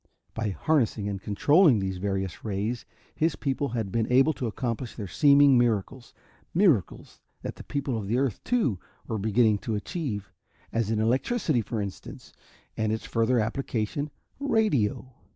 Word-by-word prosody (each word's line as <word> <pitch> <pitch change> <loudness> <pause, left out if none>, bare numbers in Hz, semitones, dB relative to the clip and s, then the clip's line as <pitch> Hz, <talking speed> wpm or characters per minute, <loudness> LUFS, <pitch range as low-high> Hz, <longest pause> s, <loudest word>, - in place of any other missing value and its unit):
By 110 -1 -2
harnessing 115 -2 0
and 100 -1 -4
controlling 145 - +4
these 95 -2 -2
various 95 -1 -3
rays, 110 +3 -3 0.3
his 160 0 +1
people 140 0 -1
had 115 -5 -3
been 115 +2 0
able 135 +5 +5
to 125 - -3
accomplish 115 +1 -3
their 105 -4 -5
seeming 140 - +5
miracles 120 +1 -1 0.4
miracles 165 - +1 0.2
that - - -5
the - - -9
people 140 -5 -2
of 100 -2 -6
earth, 125 -2 0
too, 215 - +1 0.3
were 110 - -3
beginning 110 0 +3
to 110 - -3
achieve 105 - -4 0.4
as 115 -2 0
in 110 -1 0
electricity, 130 - +1
for 110 +1 -4
instance, 100 -2 -7 0.4
and 110 -1 0
its 110 - -3
further 115 +2 +1
application, 115 +4 -2 0.3
radio. 150 - +1
115 Hz, 150 wpm, -27 LUFS, 105-140 Hz, 0.4 s, able